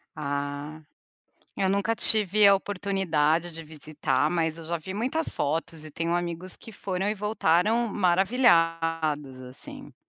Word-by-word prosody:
Ah, 145 +2 -4 0.8
eu 190 - +1
nunca 200 +3 +1
tive 210 -2 +3
a 200 - +8
oportunidade 180 -5 0
de 165 0 -9
visitar, 150 -1 -1
mas 165 -2 0
eu 165 - -9
já 170 +1 -2
vi 190 +4 -7
muitas 260 +9 -1
fotos 155 +1 -2
e 155 - -9
tenho 165 +3 -2
amigos 175 +1 -3
que 225 - -12
foram 190 0 -3
e 210 - 0
voltaram 210 +2 +1
maravilhados, 165 - +2
assim. 125 +1 -7
170 Hz, 135 wpm, -26 LUFS, 155-200 Hz, 0.8 s, a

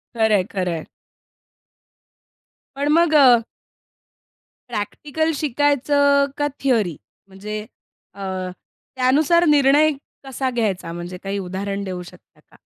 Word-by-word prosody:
खरं 220 -1 +2
आहे, 190 - +2
खरं 180 -2 -3
आहे. 160 - -6 1.9
पण 280 +1 -2
मग 335 -1 +3
अ, 255 -5 +7 1.3
प्रॅक्टिकल 295 +9 -2
शिकायचं 285 0 +2
का 290 - +1 0.2
थिअरी? 220 - +1 0.3
म्हणजे 205 +2 -6 0.5
अ, 200 - -11 0.7
त्यानुसार 290 +7 +3
निर्णय 295 0 +4 0.3
कसा 265 0 -2
घ्यायचा? 210 -8 -2
म्हणजे 175 +1 -7
काही 195 +1 -3
उदाहरण 195 +2 -4
देऊ 185 -2 -5
शकता 175 - -17
का? - - -20
245 Hz, 110 wpm, -21 LUFS, 195-290 Hz, 1.9 s, अ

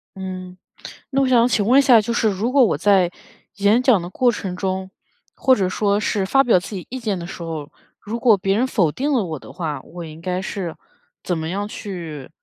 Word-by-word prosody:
嗯， 185 -1 -7 0.5
那 275 0 +2
我 270 - +2
想 240 -2 +4
请 220 -4 +1
问 250 +5 +5
一 - - +7
下， 255 -4 +6
就 230 +3 -3
是 225 -2 +2
如 210 +5 -1
果 275 0 +5
我 200 - 0
在 185 0 +3 0.5
演 205 +5 +3
讲 250 -8 +4
的 175 - -6
过 245 +5 +2
程 190 -4 -5
中， 190 0 -3 0.5
或 260 -1 +4
者 190 -5 0
说 200 +1 +1
是 205 -2 0
发 270 +8 +4
表 230 -8 +4
自 190 +4 -8
己 185 - -6
意 260 - -5
见 215 -5 -2
的 170 - -6
时 170 - -8
候， 155 -3 -6 0.3
如 225 +3 -5
果 230 -4 +5
别 195 +2 0
人 245 - +2
否 185 - +1
定 280 - -2
了 250 -6 +2
我 160 -4 -5
的 - - -12
话， 160 -4 -4
我 175 -1 -9
应 160 0 -11
该 180 +1 -2
是 185 -3 -5 0.5
怎 175 -2 -1
么 160 0 -4
样 200 +3 -3
去 170 -10 -7
195 Hz, 245 characters per minute, -21 LUFS, 180-235 Hz, 0.5 s, 一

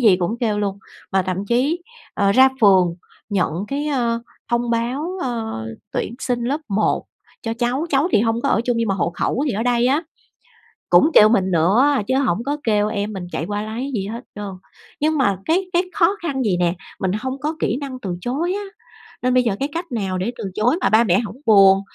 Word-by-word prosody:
gì 215 -7 +6
cũng 185 +6 -2
kêu 215 -3 0
luôn. 200 -1 -2 0.3
Và 190 - +3
thậm 185 +2 -3
chí, 275 - +1 0.3
ờ, 200 -1 +2
ra 260 +4 +7
phường 185 -5 +5 0.3
nhận 185 -6 0 0.2
cái, 290 +2 -2
a, 240 -5 0 0.3
thông 235 0 0
báo, 270 +11 -2
a, 255 - -1 0.6
tuyển 235 - -2
sinh 245 -2 -2
lớp 280 +6 -1
một 205 +2 +1 0.4
cho 225 -1 -2
cháu, 245 +7 -1
cháu 285 +5 +2
thì - - +5
hông 225 +1 +1
có 280 - +1
ở 225 - +3
chung 245 -2 0
nhưng 230 -1 0
mà 195 - +1
hộ 175 -2 0
khẩu 265 - -1
thì - - 0
ở 215 +3 -1
đây 245 0 +2
á, 285 +6 +2 0.9
cũng 305 - +6
kêu 215 - +8
mình 190 -4 +2
nữa 185 - +4 0.2
chứ 260 - +1
hổng 235 -5 +1
có 290 +1 -1
kêu 210 -2 +2
em 210 0 -3
mình 180 -3 -6
chạy 160 - -3
qua 205 +1 -3
lấy 235 +6 -4
gì 195 -2 -2
hết 230 +4 -6
trơn. 205 -1 -5 0.5
Nhưng 310 +1 +1
mà 200 -8 +2
cái 365 +4 +1
cái 350 +2 +3
khó 390 0 +3
khăn 290 -5 -2
vậy 195 -5 +1
nè, 175 -1 +2 0.3
mình 185 -1 0
hông 260 +1 -4
có 310 +2 -2
kỹ 230 - 0
năng 270 -3 -6
từ 180 -6 -4
chối 300 - -1
á. 410 +1 -3 0.6
Nên 255 0 +1
bây 250 0 +4
giờ 220 -5 0
cái 275 - -1
cách 335 -2 -5
nào 195 -6 -2
để 195 +6 -2
từ 225 - -6
chối 245 +9 +2
mà - - +3
ba 220 +2 +5
mẹ 190 -4 +3
hổng 225 +1 -5
buồn? 195 -3 +7
235 Hz, 225 wpm, -21 LUFS, 200-270 Hz, 0.9 s, kêu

